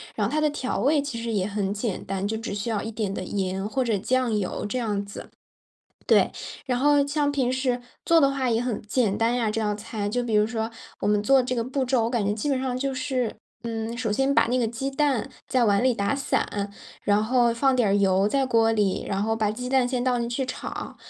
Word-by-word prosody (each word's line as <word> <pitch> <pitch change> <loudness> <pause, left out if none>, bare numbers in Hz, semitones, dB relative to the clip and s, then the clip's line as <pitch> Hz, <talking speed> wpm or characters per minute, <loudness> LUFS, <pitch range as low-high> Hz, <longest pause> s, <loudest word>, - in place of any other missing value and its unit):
然 - - 0
后 - - -2
它 310 - +1
的 305 0 +3
调 265 -3 -2
味 290 +2 +3
其 270 -5 -5
实 230 - -3
也 195 -3 +1
很 200 -1 -2
简 210 -2 -3
单， 195 0 -2
就 220 +2 -1
只 225 -2 -5
需 205 +3 -3
要 215 -3 0
一 225 - -4
点 210 -3 -3
的 - - -4
盐 190 0 -2
或 260 +4 0
者 225 -4 +1
酱 250 +2 +1
油 190 -3 -3
这 230 +5 -2
样 205 -4 -1
子 200 - -9 0.8
对。 - - +4 0.3
然 250 -2 0
后 290 +1 +4
像 290 0 0
平 260 -3 +1
时， 260 -1 0 0.2
做 330 -1 +5
的 275 -2 +4
话 270 -2 -1
也 230 0 +1
很 245 -4 -2
简 210 -1 0
单 230 +1 +2
呀， 235 -3 +1
这 220 +1 -1
道 210 -1 0
菜， 205 0 -4
就 245 +4 -1
比 235 -3 -2
如 210 0 +4
说， 225 0 -3 0.3
我 - - 0
们 210 0 +3
做 260 +5 +4
这 250 0 -2
个 230 - 0
步 265 +2 -1
骤， 250 -2 +2
我 - - +1
感 235 -4 0
觉 200 - +1
基 220 +7 -3
本 270 -2 +1
上 255 -1 -2
就 270 0 -1
是， 255 -3 -2 0.3
嗯 225 0 -3
首 235 -3 -2
先 270 +6 +1
把 - - +4
那 250 +2 +1
个 240 - +2
鸡 235 +5 -3
蛋， 270 -4 +1 0.2
在 255 -2 +3
碗 200 -1 +3
里 255 -2 +4
打 200 +5 0
散， 205 -7 -1 0.3
然 205 +1 +3
后 240 +1 +3
放 265 +2 +2
点 240 -4 +3
儿 - - +3
油 195 -1 +3
在 270 +4 +1
锅 225 -2 +3
里， 205 -4 +1
然 195 0 -1
后 225 +1 0
把 215 -2 +1
鸡 250 +3 -5
蛋 260 -1 +3
先 250 -1 -1
倒 250 -1 +1
进 235 0 -2
去 255 +2 -2
炒； 255 - -6
235 Hz, 270 characters per minute, -25 LUFS, 210-260 Hz, 0.8 s, 做